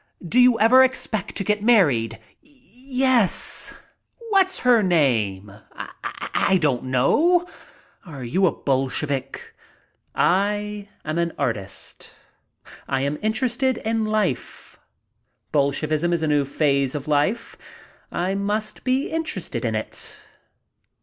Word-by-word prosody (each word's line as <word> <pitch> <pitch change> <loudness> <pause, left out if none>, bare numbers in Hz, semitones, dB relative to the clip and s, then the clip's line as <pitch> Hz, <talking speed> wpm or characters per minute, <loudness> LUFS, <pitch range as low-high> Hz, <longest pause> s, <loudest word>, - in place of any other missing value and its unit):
"Do 240 +9 +2
you 250 -2 +5
ever 250 +5 +7
expect 225 -5 -2
to 195 - -1
get 210 +1 0
married?" 140 - +3 0.2
"Yes." 260 -5 0 0.6
"What's 380 -2 +2
her 245 -3 +5
name?" 115 - +1 0.8
"I 190 - +3
don't 140 -6 0
know." 320 - +2 0.6
"Are 145 - -9
you 185 +11 +2
a - - +2
Bolshevik?" 135 0 -3 0.6
"I 205 +2 0 0.2
am 155 +2 -2
an 170 -1 -1
artist. 100 -5 -5 0.7
I 135 -1 -1
am 140 +2 -2
interested 240 +3 0
in 225 0 -1
life. 210 - -3 0.7
Bolshevism 155 +4 0
is 165 -2 -1
a - - +1
new 145 -2 +2
phase 140 -1 0
of 145 0 -5
life. 150 +10 0 0.6
I 185 +2 -1
must 210 +2 -3
be 260 +2 0
interested 315 - -4
in 110 -2 -1
it." 110 - -6
185 Hz, 115 wpm, -22 LUFS, 140-230 Hz, 0.8 s, ever